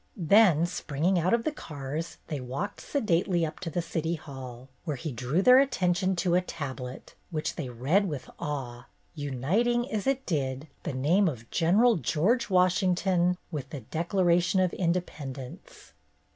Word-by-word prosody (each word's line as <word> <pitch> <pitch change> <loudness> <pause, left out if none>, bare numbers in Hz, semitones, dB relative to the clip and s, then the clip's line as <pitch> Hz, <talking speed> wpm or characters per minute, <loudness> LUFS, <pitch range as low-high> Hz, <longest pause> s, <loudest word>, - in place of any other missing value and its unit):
Then 180 -2 +5
springing 175 +1 0
out 175 +3 +1
of 235 0 +2
the 310 - 0
cars, 150 - -6
they 150 -3 -4
walked 135 +12 -4
sedately 180 - +1
up 155 - -6
to 175 - -4
the 170 +2 -2
City 165 0 -2
Hall, 130 -5 -9 0.2
where 150 -4 -2
he 155 +4 -4
drew 125 +9 0
their 250 +3 +8
attention 190 -8 +1
to 175 0 0
a 180 - +4
tablet, 135 -7 -7 0.2
which 155 -3 -3
they 145 -7 -4
read 140 - +1
with 140 -5 -5
awe, 130 -4 -5 0.3
uniting, 180 - 0
as 215 +2 -2
it 270 0 0
did, 135 -3 -2
the - - -4
name 165 +10 +3
of 120 -7 -4
Gen. 200 +4 +3
George 195 - +1
Washington 180 -1 +2
with 140 -4 -5
The 145 - -6
Declaration 175 - +1
of 185 -2 +2
Independence. 145 - -4
170 Hz, 155 wpm, -28 LUFS, 140-185 Hz, 0.3 s, their